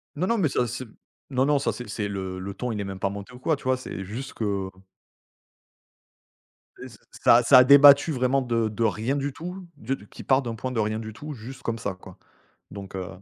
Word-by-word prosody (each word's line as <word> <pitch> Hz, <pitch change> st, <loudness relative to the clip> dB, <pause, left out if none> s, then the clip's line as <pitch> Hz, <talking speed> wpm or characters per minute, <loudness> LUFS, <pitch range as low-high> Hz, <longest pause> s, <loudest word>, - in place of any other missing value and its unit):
Non, 175 Hz, +5 st, -1 dB
non, 230 Hz, -, +1 dB
mais 185 Hz, -7 st, +2 dB
ça 125 Hz, -, 0 dB
c'est 125 Hz, +2 st, -5 dB
m 115 Hz, -, -15 dB, 0.4 s
non, 130 Hz, 0 st, +2 dB
non 145 Hz, -1 st, +3 dB
ça 135 Hz, -4 st, 0 dB
c'est 120 Hz, +3 st, -8 dB
c'est 105 Hz, 0 st, -3 dB
le 95 Hz, -2 st, -5 dB
le 95 Hz, +2 st, -6 dB
ton 125 Hz, +4 st, -4 dB
il 105 Hz, -, -3 dB
est -, -, -2 dB
même 95 Hz, -1 st, -7 dB
pas 100 Hz, -, 0 dB
monté 100 Hz, +4 st, -8 dB
ou 125 Hz, -, -12 dB
quoi 155 Hz, +4 st, +1 dB
tu 140 Hz, -, -15 dB
vois, 130 Hz, 0 st, +1 dB
c'est 110 Hz, -6 st, -7 dB
juste 115 Hz, +8 st, -7 dB
que 100 Hz, -3 st, -2 dB, 2.1 s
Et 125 Hz, -, -7 dB
c-c 110 Hz, -, -15 dB
ça 120 Hz, +1 st, +4 dB
ça 130 Hz, +3 st, +7 dB
a -, -, +8 dB
débattu 140 Hz, +3 st, +8 dB
vraiment 130 Hz, 0 st, +1 dB
de 115 Hz, -3 st, 0 dB
de 110 Hz, +2 st, -2 dB
rien 115 Hz, +4 st, 0 dB
du 140 Hz, 0 st, -2 dB
tout 180 Hz, +4 st, -8 dB
du 125 Hz, -4 st, -5 dB
qui -, -, -11 dB
part 135 Hz, 0 st, +3 dB
d'un 120 Hz, -3 st, -5 dB
point 130 Hz, +3 st, -4 dB
de 120 Hz, -, -2 dB
rien 110 Hz, 0 st, -1 dB
du 110 Hz, -1 st, -7 dB
tout, 150 Hz, +7 st, -8 dB
juste 125 Hz, +1 st, -10 dB
comme 115 Hz, -1 st, -3 dB
ça 100 Hz, -2 st, -3 dB
quoi, 95 Hz, 0 st, -14 dB, 0.5 s
donc 100 Hz, -1 st, -9 dB
heu 95 Hz, -1 st, -4 dB
120 Hz, 240 wpm, -25 LUFS, 105-135 Hz, 2.1 s, a